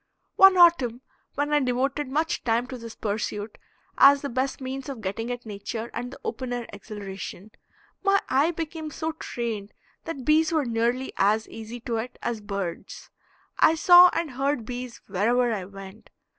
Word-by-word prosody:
One 385 -1 +7
autumn 270 -9 +5 0.3
when 290 +1 -1
I 295 - +5
devoted 265 +2 -1
much 310 +5 -1
time 235 +1 +1
to 255 - -6
this 230 -1 -9
pursuit, 210 0 -4 0.4
as 280 +1 +7
the 280 - -2
best 260 +3 -2
means 265 +1 -5
of 270 -4 -6
getting 220 +3 -4
at 245 0 -6
nature 220 +2 -6
and 245 - -4
the 265 - -11
open 255 -2 -4
air 240 -1 -3
exhilaration, 200 -1 -8 0.5
my 395 0 +3
eye 275 +5 +3
became 320 -1 -5
so 320 +1 -3
trained 230 -9 -5 0.3
that 280 -6 -6
bees 315 +1 +4
were 310 -4 +1
nearly 235 +3 -1
as 215 +3 +2
easy 225 +2 -8
to 230 0 -2
it 245 +3 -5
as 235 -3 -2
birds. 195 -4 -6 0.5
I 320 - +6
saw 355 +2 +8
and 330 -3 -2
heard 270 -2 -1
bees 245 0 -7
wherever 230 +5 +1
I 195 -4 -4
went. 195 +1 -12
245 Hz, 170 wpm, -26 LUFS, 220-290 Hz, 0.5 s, saw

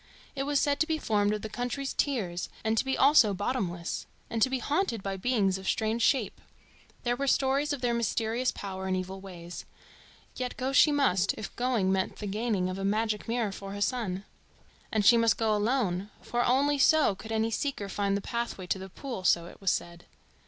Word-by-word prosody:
It 275 0 -2
was 290 -1 +3
said 285 0 +1
to 315 - +2
be 320 -1 0
formed 210 -7 +1
of 210 0 -3
the - - -2
country's 245 +5 -3
tears 195 -11 -1
and 220 0 +1
to - - +2
be 265 -1 -1
also 265 -8 +6
bottomless, 185 -5 -2 0.2
and 225 -1 -2
to 260 - +5
be 265 - 0
haunted 270 - -1
by 195 -1 -2
beings 195 -3 +1
of 190 - -8
strange 220 +1 0
shape. 230 -4 +1 0.6
There 240 0 +1
were 275 +2 -2
stories 275 +2 +2
of 285 -3 -3
their 245 -2 +1
mysterious 235 +2 0
power 190 -1 -6
and 185 0 0
evil 190 +1 -5
ways. 175 -3 -8 0.7
Yet 250 -1 -4
go 265 +1 -2
she 300 - +6
must, 200 -11 +2
if 215 - -7
going 240 -6 +1
meant 190 -1 0
the 210 - -7
gaining 205 -2 -1
of 185 +1 -4
a - - -3
magic 215 +2 0
mirror 230 -3 0
for 195 0 -7
her 200 - -5
son. 205 -5 -1 0.7
And 215 -2 +1
she 235 - +8
must 230 -1 +3
go 220 -1 +2
alone, 210 -4 0
for 240 0 0
only 280 +4 +2
so 310 -4 +5
could 220 +4 -10
any 225 +1 +1
seeker 225 -3 -2
find 200 0 0
the - - -4
pathway 235 -4 -4
to 185 +2 -1
the 190 0 -8
pool, 240 -1 -6
so 170 -2 +3
it 175 - -13
was 195 - +1
said. 170 0 -3
220 Hz, 210 wpm, -29 LUFS, 195-255 Hz, 0.7 s, she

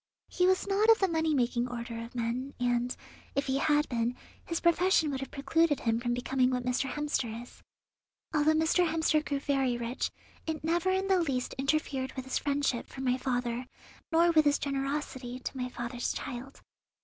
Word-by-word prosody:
He 360 0 +2
was 375 0 +3
not 400 +3 +2
of 450 - +8
the 385 - +2
money 320 -2 +1
making 245 -1 +1
order 235 -1 -5
of 230 +2 -11
men, 245 +3 -2
and, 245 0 +1 0.4
if 275 - +1
he 270 0 0
had 295 +1 +3
been, 235 0 -1 0.3
his 335 - -2
profession 340 -2 +3
would 270 - -2
have 270 - -5
precluded 290 +2 +1
him 230 -1 +1
from 240 0 -1
becoming 255 +1 +1
what 250 -1 -1
Mr. 250 +2 0
Hemster 255 -6 -2
is. 245 - -16 0.7
Although 310 0 +4
Mr. 320 +3 +3
Hemster 315 -1 +2
grew 285 -2 -2
very 270 -3 +1
rich, 240 +2 -2 0.4
it 315 -1 -3
never 340 +3 +1
in 380 +1 +1
the 380 -2 +4
least 265 -6 -1
interfered 275 -2 0
with 260 -1 -6
his 265 - -1
friendship 285 -4 0
for 265 - -8
my 250 -1 +2
father 245 -1 -2 0.4
nor 335 +1 +5
with 310 -2 +5
his 290 0 +4
generosity 275 -2 -3
to 260 - -6
my 250 -1 -3
father's 240 0 -3
child. 265 +1 -7
270 Hz, 185 wpm, -30 LUFS, 245-315 Hz, 0.7 s, of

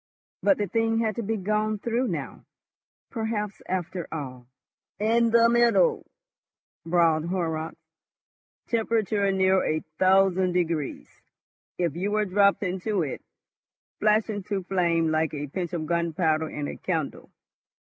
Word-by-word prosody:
But 290 - +4
the 205 - 0
thing 225 +3 0
had 220 -2 0
to - - -1
be 225 +1 -2
gone 215 +2 0
through 235 +4 -1
now. - - -5 0.7
Perhaps, 220 -3 -3
after 180 -1 -3
all... 130 -5 -6 0.5
"In 230 +2 +2
the 230 0 +5
middle," 240 - +3 0.8
bawled 165 -2 +2
Horrocks, 165 -3 -2 0.9
"temperature 220 -3 +1
near 190 0 +3
a 155 0 0 0.2
thousand 190 -1 +4
degrees. 165 -5 -1 0.7
If 170 -4 -1
you 190 +4 -1
were 210 0 +1
dropped 200 +1 +3
into 190 +1 -1
it.... 140 - -5 0.8
flash 215 0 +3
into 205 -2 -3
flame 170 -3 +1
like 155 -1 0
a 145 0 -3
pinch 175 +5 -4
of 165 -3 -3
gunpowder 160 -1 0
in 145 -1 -4
a - - -6
candle. - - -3
190 Hz, 130 wpm, -26 LUFS, 165-215 Hz, 0.9 s, the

